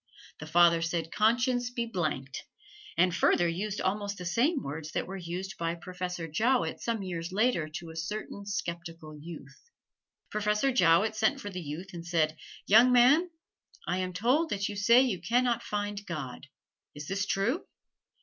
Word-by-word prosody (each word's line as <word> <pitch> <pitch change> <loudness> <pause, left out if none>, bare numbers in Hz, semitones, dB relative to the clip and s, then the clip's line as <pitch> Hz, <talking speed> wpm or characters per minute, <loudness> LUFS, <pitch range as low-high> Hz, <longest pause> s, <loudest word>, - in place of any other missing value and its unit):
The 155 - -8
father 170 +1 +5
said 165 -1 -2
conscience 245 +3 +2
be 240 -1 -2
blanked: 155 - -3 0.5
and 180 0 +3
further 175 - +3
used 195 +5 -3
almost 200 +1 -1
the 180 - -7
same 255 - +1
words 155 +2 -6
that - - -1
were 190 - -7
used 185 +1 -6
by 165 0 -1
Professor 180 -1 -5
Jowett 235 +11 +1
some 230 -3 -2
years 170 -2 -4
later 205 -6 +1
to 165 +1 -7
a - - -12
certain 200 +3 -5
skeptical 170 -5 -5
youth. 150 - -11 0.6
Professor 210 +5 +1
Jowett 205 -1 +4
sent 220 +6 +1
for 205 -5 -6
the 180 -1 -5
youth 170 +5 -7
and 170 -1 -7
said, 160 -2 +1 0.3
"Young 230 +5 +6
man, 265 +9 +5 0.6
I 180 +2 0
am 185 0 -2
told 250 - +1
that 200 -4 -1
you 205 - -5
say 235 +5 +6
you 205 -10 -1
can 235 +8 +2
not 240 -1 +1
find 205 -1 -3
God. 145 -7 -6 0.5
Is 145 0 -8
this 195 0 -1
true?" 225 - 0
190 Hz, 170 wpm, -29 LUFS, 170-220 Hz, 0.6 s, Young